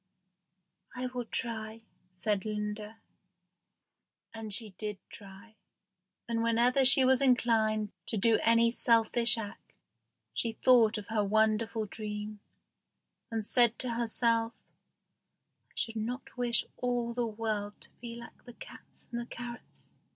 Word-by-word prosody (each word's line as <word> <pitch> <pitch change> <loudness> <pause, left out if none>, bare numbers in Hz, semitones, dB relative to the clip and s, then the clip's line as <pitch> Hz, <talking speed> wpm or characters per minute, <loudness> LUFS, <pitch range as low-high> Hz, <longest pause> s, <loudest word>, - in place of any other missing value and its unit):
"I 250 0 -3
will 250 -1 -4
try," 225 -1 -4 0.3
said 195 +2 -1
Linda. 210 0 -4 1.4
And 225 -1 -7
she 215 +1 -3
did 210 +2 -5
try, 200 +2 -13 0.7
and 230 -1 -1
whenever 235 +3 +3
she 265 0 +7
was 260 0 +4
inclined 225 -5 +2 0.2
to 220 - -1
do 225 +3 +4
any 230 0 +4
selfish 230 0 +3
act 205 -3 -8 0.6
she 225 - -1
thought 230 -2 +5
of 205 -1 -8
her 220 -2 +1
wonderful 220 +2 +1
dream, 210 0 -6 0.9
and 225 -2 -3
said 235 0 +3
to 250 -2 +1
herself, 230 0 +1 1.2
"I - - -29
should 225 -1 -2
not 240 +4 -4
wish 245 -1 +1
all 245 -1 -1
the 240 0 -1
world 210 -2 -3
to - - -11
be 235 -1 -7
like 235 0 -12
the 245 - -11
cats - - -12
and 240 0 -2
the 235 - -8
carrots." 240 -1 -9
225 Hz, 130 wpm, -31 LUFS, 215-240 Hz, 1.4 s, she